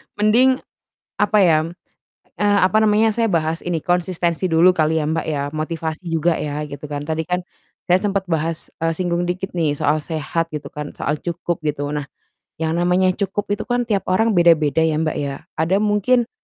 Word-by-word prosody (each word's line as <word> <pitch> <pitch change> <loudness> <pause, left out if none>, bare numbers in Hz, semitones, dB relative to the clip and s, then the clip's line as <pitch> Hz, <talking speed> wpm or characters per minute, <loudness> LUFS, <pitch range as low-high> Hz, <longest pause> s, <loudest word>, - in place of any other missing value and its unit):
mending 240 +6 +3 0.5
apa 210 - +2
ya, 160 -4 +4 0.8
eee, 205 -1 +4
apa 215 +4 +3
namanya, 215 +1 +3
saya 230 0 +1
bahas 165 -2 0
ini, 175 -2 -2
konsistensi 175 +1 0
dulu 170 +3 +5
kali 160 -2 +1
ya, 150 - 0
Mbak, 160 +1 -1
ya, 145 -2 -1
motivasi 160 +1 -3
juga 165 +1 +2
ya, 150 0 -3
gitu 145 0 -8
kan. 145 0 -4
Tadi 160 +1 -1
kan 180 0 -1 0.4
saya 180 +1 +4
sempet 200 -2 -1
bahas, 165 -1 -2
eee, 165 - +2
singgung 175 -1 0
dikit 185 +2 -3
nih 155 -4 0
soal 150 +2 +1
sehat 160 +2 -2
gitu 150 -2 -6
kan, 150 0 -5
soal 150 +1 -2
cukup, 175 0 -3
gitu, 145 -1 -2
nah, 145 -1 -4 0.5
yang 160 +1 0
namanya 180 +2 +3
cukup 200 0 -2
itu 205 - -2
kan 245 0 0
tiap 200 -3 0
orang 205 +2 +2
beda-beda 160 -2 +4
ya, 155 -1 +1
Mbak, 155 - -1
ya, 140 -1 -2 0.2
ada 165 +5 +2
mungkin 215 +4 +2
170 Hz, 185 wpm, -20 LUFS, 155-190 Hz, 0.8 s, dulu